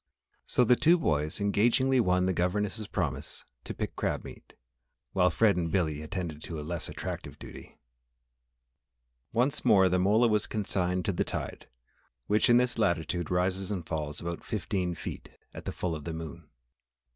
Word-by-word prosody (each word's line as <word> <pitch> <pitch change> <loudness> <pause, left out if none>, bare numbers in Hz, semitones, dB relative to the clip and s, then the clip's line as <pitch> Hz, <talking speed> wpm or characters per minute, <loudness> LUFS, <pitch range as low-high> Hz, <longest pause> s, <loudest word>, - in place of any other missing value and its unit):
So 125 - +3
the 125 +1 +5
two 165 +7 +5
boys 75 - 0
engagingly 120 +6 +3
won 90 -4 +3
the 95 - +1
governess' 100 +4 -1
promise 75 -7 -3 0.2
to - - -4
pick - - -4
crab - - -1
meat, - - -12 0.6
while 90 -1 +4
Fred 110 0 +3
and 85 -2 -1
Billy 80 -6 0
attended 80 -2 -5
to 80 -1 -6
a 75 - -6
less 85 0 -3
attractive - - -6
duty. - - -11 1.5
Once 130 +6 +1
more 95 -2 +5
the 90 +1 +2
mola 105 +6 +4
was 105 -2 +1
consigned 90 -3 -1
to 100 - 0
the - - +1
tide, - - -5 0.6
which 105 +4 +3
in 120 - +7
this 125 -1 +1
latitude 85 -3 0
rises 90 +2 0
and 95 -6 -3
falls 75 -3 -3
about 85 0 -5
fifteen 90 -3 -2
feet - - -7 0.2
at - - -9
the - - -2
full 90 -2 -2
of 75 -2 -6
the 85 - -3
moon. 80 -2 -8
90 Hz, 170 wpm, -29 LUFS, 85-105 Hz, 1.5 s, in